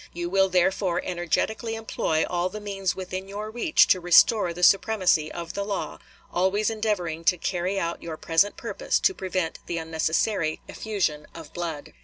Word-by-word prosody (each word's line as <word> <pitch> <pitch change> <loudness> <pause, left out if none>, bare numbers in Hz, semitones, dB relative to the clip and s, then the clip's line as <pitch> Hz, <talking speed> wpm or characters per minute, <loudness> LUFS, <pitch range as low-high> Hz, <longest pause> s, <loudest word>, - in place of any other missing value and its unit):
You 175 0 -4
will 195 0 +3
therefore 185 0 +1
energetically 185 +6 -1
employ 165 -7 -1
all 175 +1 -1
the 215 - -7
means 195 -2 -2
within 185 0 -5
your 210 +2 -6
reach 240 +7 +4
to 185 - +4
restore 175 +2 +5
the 175 +1 -6
supremacy 185 -6 +3
of 170 -1 -6
the 200 - -2
law, 200 -1 -4 0.3
always 195 +5 +1
endeavoring 195 -7 -2
to 180 - +4
carry 185 +3 -1
out 170 -1 -3
your 160 -2 -6
present 165 +7 +1
purpose - - -1
to 380 - +3
prevent 185 - -3
the 170 - -3
unnecessary 160 +2 0
effusion 175 -9 -2
of 165 -3 -10
blood." 165 -4 -5
185 Hz, 165 wpm, -25 LUFS, 170-200 Hz, 0.3 s, restore